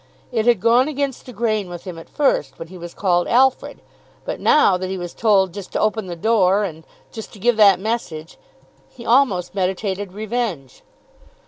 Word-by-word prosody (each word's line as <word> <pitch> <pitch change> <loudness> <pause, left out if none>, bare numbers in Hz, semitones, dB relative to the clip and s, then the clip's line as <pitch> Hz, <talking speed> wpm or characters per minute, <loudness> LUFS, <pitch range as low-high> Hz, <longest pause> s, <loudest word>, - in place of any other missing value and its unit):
It 225 -2 -1
had 235 -4 +4
gone 235 +6 +3
against 280 -4 -3
the - - -8
grain 215 -4 -1
with 175 -1 -8
him 180 -4 -8
at 165 - -14
first, 285 -2 0
when 165 - -9
he 185 - -11
was 170 0 -9
called 175 -3 +1
Alfred; 260 +2 +1 0.4
but - - -4
now 250 -10 +4
that 185 0 -4
he 190 - -3
was 175 -1 -6
told 195 -5 +2
"just 200 -1 -8
to - - -1
open 215 -2 0
the 175 - -5
door," 200 +1 +2
and 160 -5 -6 0.3
"just 220 - -9
to 210 - -13
give 240 +4 +2
that 200 -4 +6
message," 190 -7 -4 0.5
he 235 - -13
almost 230 -8 +2
meditated 190 0 -2
revenge. 210 - -4
205 Hz, 190 wpm, -20 LUFS, 180-235 Hz, 0.5 s, that